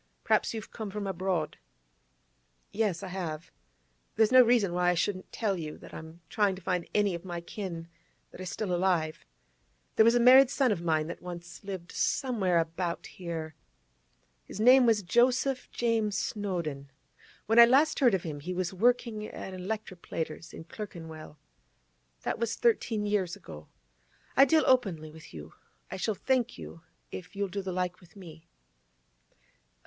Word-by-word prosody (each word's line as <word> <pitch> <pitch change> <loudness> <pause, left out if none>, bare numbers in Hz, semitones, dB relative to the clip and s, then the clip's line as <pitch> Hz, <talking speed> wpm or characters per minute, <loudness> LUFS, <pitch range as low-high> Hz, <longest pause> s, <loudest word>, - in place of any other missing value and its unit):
P'r'aps - - +2
you've 220 -1 -7
come 220 -3 -6
from 205 +1 -4
abroad?' 185 -4 -2 1.1
'Yes, 205 -6 -1
I 190 - -5
have. 170 -3 -5 0.6
There's 220 +1 +3
no 255 0 +9
reason 230 -7 +3
why 180 0 +2
I 180 - +2
shouldn't 185 +2 -2
tell 210 -4 -1
you 155 -3 -6
that - - -14
I'm 160 +2 -10
trying 200 +2 +1
to 190 - -11
find 180 -1 -2
any 205 -2 +3
of 170 - -6
my 175 -2 -5
kin 170 -2 -6 0.4
that - - -11
are - - -5
still 195 0 -3
alive. 165 -4 0 0.7
There - - +8
was 230 +2 +5
a - - +4
married 255 +2 +8
son 265 -3 +2
of 185 -5 -1
mine 160 -2 +1
that 170 - -7
once 175 0 -9
lived 190 -3 -7
somewhere 210 -10 +1
about 170 +1 -2
here. 165 -3 -6 0.9
His 190 - -9
name 250 +2 +7
was 215 -3 +3
Joseph 250 +6 +2
James 225 -4 0
Snowdon. 170 -12 -3 0.6
When 225 +2 +4
I 235 - +12
last 275 +6 +3
heard 245 -7 +5
of 185 - -3
him, 150 -3 -5
he 180 +5 -5
was 185 0 -2
working 225 +1 +1
at 190 - -8
a - - -6
'lectroplater's 180 -5 -5
in - - -9
Clerkenwell. 160 -5 -9 0.9
That - - -2
was 230 -1 -1
thirteen 230 - +1
years 200 -3 0
ago. 75 - -11 0.7
I 275 - +8
deal 315 +1 +4
openly 190 -12 +1
with 160 0 -13
you; 75 -1 -10 0.4
I 190 - -4
shall 215 +3 -1
thank 250 +2 0
you 165 - -10 0.3
if 180 +2 -8
you'll 200 -1 -1
do 200 +2 -3
the 190 -1 -4
like 180 0 -2
with 175 +3 -20
me. 165 -5 -12
190 Hz, 165 wpm, -29 LUFS, 170-220 Hz, 1.1 s, I